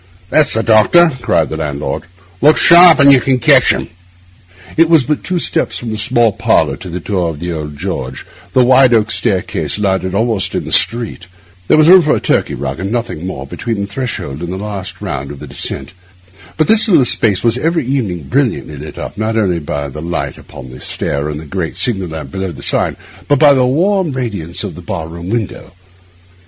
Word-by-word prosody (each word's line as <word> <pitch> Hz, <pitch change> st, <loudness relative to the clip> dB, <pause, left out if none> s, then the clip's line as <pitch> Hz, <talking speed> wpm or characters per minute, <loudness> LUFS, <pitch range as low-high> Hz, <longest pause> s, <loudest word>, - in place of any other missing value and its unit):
'That's 155 Hz, -6 st, +3 dB
the 115 Hz, -, 0 dB
doctor,' 120 Hz, +10 st, +4 dB
cried 80 Hz, -8 st, +1 dB
the 80 Hz, -, -5 dB
landlord. 75 Hz, -2 st, -4 dB, 0.4 s
'Look 150 Hz, +4 st, +5 dB
sharp, 170 Hz, -1 st, +7 dB
and 140 Hz, 0 st, +7 dB
you 130 Hz, -, +4 dB
can 130 Hz, 0 st, +1 dB
catch 125 Hz, -, +4 dB
him.' -, -, -3 dB, 0.9 s
It 165 Hz, 0 st, +3 dB
was 165 Hz, -5 st, +5 dB
but 150 Hz, +3 st, -2 dB
two 180 Hz, -, -2 dB
steps -, -, -1 dB
from 120 Hz, -2 st, -6 dB
the 110 Hz, -, -4 dB
small 120 Hz, 0 st, +2 dB
parlour -, -, +1 dB
to 90 Hz, -, -9 dB
the 90 Hz, +1 st, -5 dB
door 90 Hz, -1 st, -2 dB
of 75 Hz, -3 st, -7 dB
the 85 Hz, +2 st, -4 dB
old 75 Hz, -2 st, -6 dB
George 70 Hz, -7 st, -5 dB
Inn; -, -, -16 dB, 0.3 s
the 130 Hz, -, +4 dB
wide 130 Hz, -1 st, +5 dB
oak 110 Hz, -1 st, +1 dB
staircase 95 Hz, 0 st, -1 dB
landed 95 Hz, -2 st, -1 dB
almost 110 Hz, -2 st, 0 dB
in -, -, -2 dB
the -, -, -8 dB
street; 115 Hz, -6 st, +1 dB, 0.4 s
there -, -, +4 dB
was 155 Hz, 0 st, +5 dB
room 185 Hz, +1 st, +8 dB
for 155 Hz, -2 st, +1 dB
a -, -, -1 dB
Turkey -, -, 0 dB
rug 70 Hz, +1 st, -5 dB
and 95 Hz, +3 st, -4 dB
nothing 115 Hz, -8 st, -3 dB
more 65 Hz, -8 st, -6 dB
between 110 Hz, -, -4 dB
the -, -, -2 dB
threshold 100 Hz, -, -5 dB
and 85 Hz, 0 st, -5 dB
the 95 Hz, -, -4 dB
last 100 Hz, -1 st, -7 dB
round 70 Hz, -9 st, -5 dB
of 70 Hz, -, -8 dB
the -, -, -8 dB
descent; -, -, -1 dB, 0.6 s
but 155 Hz, -, +2 dB
this 220 Hz, 0 st, +3 dB
little 155 Hz, -9 st, +4 dB
space 105 Hz, -5 st, +2 dB
was 120 Hz, +1 st, +2 dB
every 165 Hz, 0 st, 0 dB
evening 110 Hz, -, -2 dB
brilliantly 70 Hz, +2 st, -2 dB
lit 75 Hz, +3 st, -9 dB
up, 100 Hz, -, -7 dB
not 110 Hz, +1 st, -1 dB
only 95 Hz, -6 st, 0 dB
by 70 Hz, -2 st, -4 dB
the 75 Hz, +3 st, -8 dB
light 85 Hz, +2 st, -4 dB
upon 65 Hz, -, -12 dB
the 65 Hz, -, -12 dB
stair 70 Hz, +2 st, -3 dB
and 75 Hz, 0 st, -5 dB
the 80 Hz, -, -10 dB
great 80 Hz, +2 st, -4 dB
signal 100 Hz, -8 st, +1 dB
lamp 80 Hz, -1 st, -8 dB
below 95 Hz, -1 st, -4 dB
the 70 Hz, -3 st, -11 dB
sign, -, -, 0 dB, 0.3 s
but 145 Hz, -, +3 dB
by 145 Hz, +1 st, +6 dB
the 130 Hz, -2 st, +2 dB
warm 180 Hz, +3 st, +1 dB
radiance 105 Hz, -10 st, -4 dB
of -, -, -5 dB
the -, -, -10 dB
bar 80 Hz, -, -5 dB
room 85 Hz, +2 st, -8 dB
window. 110 Hz, -5 st, -4 dB
105 Hz, 215 wpm, -14 LUFS, 85-130 Hz, 0.9 s, room